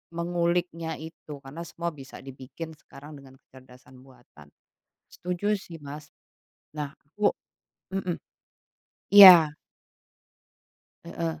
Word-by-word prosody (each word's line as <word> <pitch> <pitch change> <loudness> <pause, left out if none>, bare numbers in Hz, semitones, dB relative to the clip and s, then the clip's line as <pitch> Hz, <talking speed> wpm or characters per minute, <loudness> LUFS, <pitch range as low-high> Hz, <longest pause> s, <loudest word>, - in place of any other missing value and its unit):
menguliknya 170 -1 -2
itu. 155 -2 -11
Karena 140 +5 -9
semua 170 0 -4
bisa 140 -2 -12
dibikin 135 +5 -9
sekarang 145 +2 -14
dengan 135 -1 -16
kecerdasan 130 0 -18
buatan. 120 - -19 0.7
Setuju 180 +4 -2
sih, 175 -3 -11
Mas. 145 +1 -10 0.6
Nah, 150 -2 -4 0.2
aku 205 +8 -1 0.6
mhm. 185 -3 -2 1.0
Iya. 175 -7 +10 1.5
Heeh. 80 -2 -5
155 Hz, 95 wpm, -26 LUFS, 135-170 Hz, 1.5 s, Iya